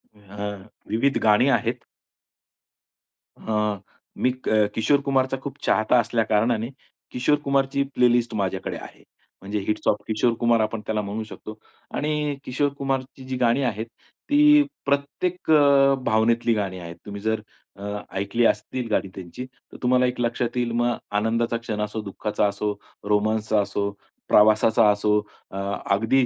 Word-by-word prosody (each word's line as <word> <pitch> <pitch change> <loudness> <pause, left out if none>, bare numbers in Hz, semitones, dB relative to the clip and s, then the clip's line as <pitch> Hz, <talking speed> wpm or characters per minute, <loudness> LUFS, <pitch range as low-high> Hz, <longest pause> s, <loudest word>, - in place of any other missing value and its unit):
अ, 100 0 -8 0.4
विविध 125 +6 +1
गाणी 110 +4 +5
आहेत. 125 -2 0 1.5
अ, 105 -2 -1 0.4
मी 125 - +2 0.2
क 105 -1 +3
किशोर 140 +5 +2
कुमारचा 135 -1 +1
खूप 140 0 -6
चाहता 110 +3 +3
असल्या 115 0 +1
कारणाने 110 +2 +1 0.4
किशोर 130 +4 +2
कुमारची 140 0 +1
प्लेलिस्ट 120 -1 +3
माझ्याकडे 95 -2 -2
आहे. - - -12 0.4
म्हणजे 100 +2 -3
हिट्स 105 0 -1
ऑफ - - +5
किशोर 110 +2 +1
कुमार 120 -1 +3
आपण 110 0 -2
त्याला 110 0 -1
म्हणू 105 +2 -4
शकतो 110 0 -10 0.4
आणि 150 -1 -1
किशोर 140 +3 0
कुमारची 135 -1 -3
जी 130 - -3
गाणी 125 +2 +2
आहेत 110 -3 -1 0.4
ती 295 0 +6 0.2
प्रत्येक 145 +6 -1
अ, 140 -2 +6
भावनेतली 115 +1 +2
गाणी 100 -4 -2
आहेत. 85 -1 -8
तुम्ही 100 0 -7
जर 110 +1 0 0.3
अ, 100 - -11 0.3
ऐकली 115 +4 +1
असतील 115 +4 0
गाणी 105 - +1
त्यांची, 95 +7 -7
तर 130 - -17
तुम्हाला 125 +1 +4
एक 125 0 -2
लक्षात 120 +1 -1
येईल 120 -1 0
मग 120 0 +1 0.2
आनंदाचा 115 +2 0
क्षण 110 -2 -4
असो, 105 +1 -3
दुःखाचा 105 +1 -1
असो, 100 +1 -2 0.4
रोमान्सचा 110 0 +2
असो, 100 0 -2 0.4
प्रवासाचा 110 +1 +5
असो, 105 +1 +2 0.3
अ, 95 - -6 0.4
अगदी 120 +5 +2
115 Hz, 145 wpm, -24 LUFS, 105-130 Hz, 1.5 s, ती